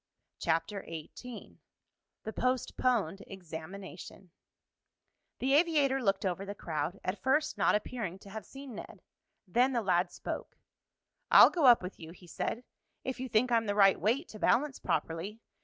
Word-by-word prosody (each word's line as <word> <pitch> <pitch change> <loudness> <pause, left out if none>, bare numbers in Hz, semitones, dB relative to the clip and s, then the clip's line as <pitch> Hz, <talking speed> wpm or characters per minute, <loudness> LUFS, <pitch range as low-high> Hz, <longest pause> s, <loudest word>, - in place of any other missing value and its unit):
CHAPTER 170 +5 -1
XVIII 170 +9 -9 0.6
THE 220 - -5
POSTPONED 245 -6 0
EXAMINATION 185 +1 -9 1.1
The 265 +2 +1
aviator 290 -4 +3
looked 195 -4 +1
over 185 +1 -1
the 200 +1 -6
crowd, 160 +2 -3
at 185 +1 -3
first 285 +6 +1
not - - +3
appearing 210 -4 -3
to 195 0 -14
have 220 +1 -6
seen 270 -2 -10
Ned. 210 - -10 0.4
Then 250 +8 +3
the 235 -2 0
lad 180 -2 +2
spoke. - - -6 0.7
"I'll - - +9
go 320 -7 +3
up 240 -5 +7
with 180 - -7
you," 165 0 -9
he 180 - -16
said, 225 +7 -3 0.4
"if 260 -1 -4
you 260 0 -4
think 240 +3 +2
I'm 230 -2 +2
the 205 - 0
right 195 -2 +5
weight 245 - +1
to 215 - -10
balance 270 +6 +2
properly. 165 +5 -2
205 Hz, 155 wpm, -31 LUFS, 180-255 Hz, 1.1 s, I'll